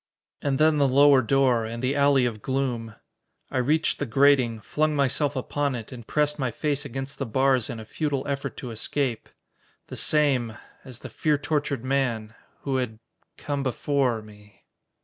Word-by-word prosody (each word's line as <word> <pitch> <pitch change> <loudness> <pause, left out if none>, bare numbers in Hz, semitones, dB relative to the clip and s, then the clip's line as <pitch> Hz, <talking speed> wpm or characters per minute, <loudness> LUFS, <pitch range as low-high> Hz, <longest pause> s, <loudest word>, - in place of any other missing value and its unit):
And 140 -2 0
then 155 0 +4
the 140 - +4
lower 140 0 +6
door, 130 -1 +2
and 115 +2 -5
the 130 +3 +1
alley 140 -2 +4
of 110 -3 -3
gloom. 125 -4 -2 0.6
I 130 - 0
reached 150 +6 +1
the 145 - -2
grating, 130 -2 +3
flung 155 +8 0
myself 145 +1 +1
upon 140 +1 -1
it 115 0 -7
and 120 -3 -10
pressed 150 0 0
my 130 -2 0
face 145 +4 -2
against 135 +1 -6
the 135 - -1
bars 130 +1 +2
in 120 - -5
a 110 - -9
futile 145 +2 -2
effort 140 -1 -3
to 125 - -6
escape. 120 +2 -2 0.6
The - - -6
same 130 -7 +1 0.3
as 125 -3 -10
the 130 - -8
fear 150 +5 +1
tortured 145 -3 -2
man 125 -5 -1 0.3
who 135 -2 -1
had 125 -4 -3 0.4
come 145 -1 -3
before 130 -3 0
me. 105 -1 -18
135 Hz, 170 wpm, -25 LUFS, 120-145 Hz, 0.6 s, lower